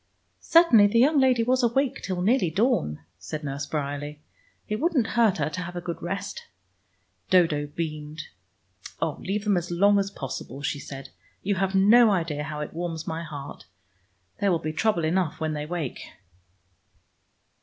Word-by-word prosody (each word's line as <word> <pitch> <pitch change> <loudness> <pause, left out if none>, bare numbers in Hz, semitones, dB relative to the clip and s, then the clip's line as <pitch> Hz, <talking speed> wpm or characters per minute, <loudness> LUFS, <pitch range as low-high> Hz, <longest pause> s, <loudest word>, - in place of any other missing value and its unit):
"Certainly 290 -12 +6
the 205 - +1
young 280 +5 +5
lady 255 -3 +4
was 255 +2 +2
awake 250 +3 +1
till 180 -2 -3
nearly 220 -3 +3
dawn," 160 - 0 0.2
said 150 - -6
Nurse 140 0 -4
Bryerley. 145 0 -4 0.5
"It 215 - -2
wouldn't 310 -6 +2
hurt 230 -5 +3
her 150 -2 0
to 180 - -4
have 175 0 -7
a - - -2
good 175 -1 -6
rest." 195 +3 -5 0.8
Dodo 160 -5 +3
beamed. 155 0 -5 0.8
"Oh, - - -1
leave 200 +2 -2
them 205 -3 +2
as 175 0 -3
long 200 +4 +4
as 195 0 -1
possible," 135 -4 -7
she 145 - -2
said. 135 -1 -9 0.3
"You 200 - +1
have 195 0 -1
no 220 +4 +6
idea 165 -6 -1
how 150 0 -5
it 150 - -6
warms 165 -1 -4
my 160 +1 -3
heart. 145 -3 -8 0.7
There 200 - +2
will 170 - +3
be 155 -1 -4
trouble 175 -2 +1
enough 170 0 0
when 160 -1 -1
they 150 0 -4
awake." 160 -5 -4
175 Hz, 165 wpm, -26 LUFS, 150-205 Hz, 0.8 s, Certainly